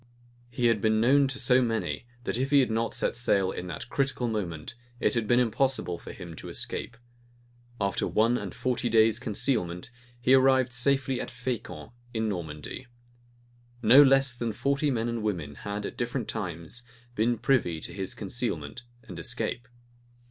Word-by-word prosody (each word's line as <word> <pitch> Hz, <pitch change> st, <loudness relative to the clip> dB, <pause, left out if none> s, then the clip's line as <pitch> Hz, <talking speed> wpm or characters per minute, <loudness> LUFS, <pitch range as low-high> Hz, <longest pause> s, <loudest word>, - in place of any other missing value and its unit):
He 120 Hz, 0 st, -2 dB
had 115 Hz, -3 st, +3 dB
been 110 Hz, 0 st, +3 dB
known 135 Hz, +4 st, +5 dB
to 135 Hz, 0 st, -2 dB
so 130 Hz, -1 st, +4 dB
many, 115 Hz, 0 st, -2 dB, 0.2 s
that -, -, -2 dB
if 135 Hz, +1 st, 0 dB
he 145 Hz, -1 st, +6 dB
had 125 Hz, -, 0 dB
not 115 Hz, +1 st, -1 dB
set -, -, 0 dB
sail 100 Hz, -6 st, +2 dB
in 90 Hz, -, -6 dB
that 85 Hz, +4 st, -6 dB
critical 135 Hz, -2 st, -1 dB
moment, 90 Hz, -9 st, -4 dB, 0.3 s
it -, -, +2 dB
had 115 Hz, -3 st, 0 dB
been 120 Hz, +2 st, +4 dB
impossible 120 Hz, -6 st, 0 dB
for -, -, -9 dB
him 85 Hz, -3 st, -9 dB
to -, -, -8 dB
escape. 120 Hz, -, -4 dB, 0.8 s
After 100 Hz, -1 st, 0 dB
one 115 Hz, +3 st, +3 dB
and 105 Hz, -6 st, -4 dB
forty 125 Hz, -1 st, -1 dB
days' 110 Hz, 0 st, +4 dB
concealment, 105 Hz, -7 st, -1 dB, 0.3 s
he 125 Hz, +2 st, +3 dB
arrived 130 Hz, -1 st, +4 dB
safely 135 Hz, 0 st, +1 dB
at -, -, -5 dB
Fescamp, 125 Hz, -2 st, -5 dB, 0.2 s
in 110 Hz, 0 st, 0 dB
Normandy. 85 Hz, -, -5 dB, 1.0 s
No 120 Hz, +6 st, +9 dB
less 135 Hz, -2 st, +5 dB
than 120 Hz, -2 st, -3 dB
forty 140 Hz, +6 st, 0 dB
men 115 Hz, -3 st, 0 dB
and 115 Hz, -1 st, -2 dB
women 85 Hz, -9 st, -2 dB
had 100 Hz, +6 st, -5 dB
at -, -, -6 dB
different 120 Hz, -1 st, -2 dB
times 90 Hz, +1 st, -5 dB, 0.3 s
been 120 Hz, +1 st, +1 dB
privy 115 Hz, -9 st, +1 dB
to -, -, -8 dB
his 95 Hz, -2 st, -3 dB
concealment 100 Hz, -, -3 dB, 0.2 s
and 95 Hz, -7 st, -9 dB
escape. 120 Hz, +5 st, -3 dB
115 Hz, 170 wpm, -28 LUFS, 100-125 Hz, 1.0 s, No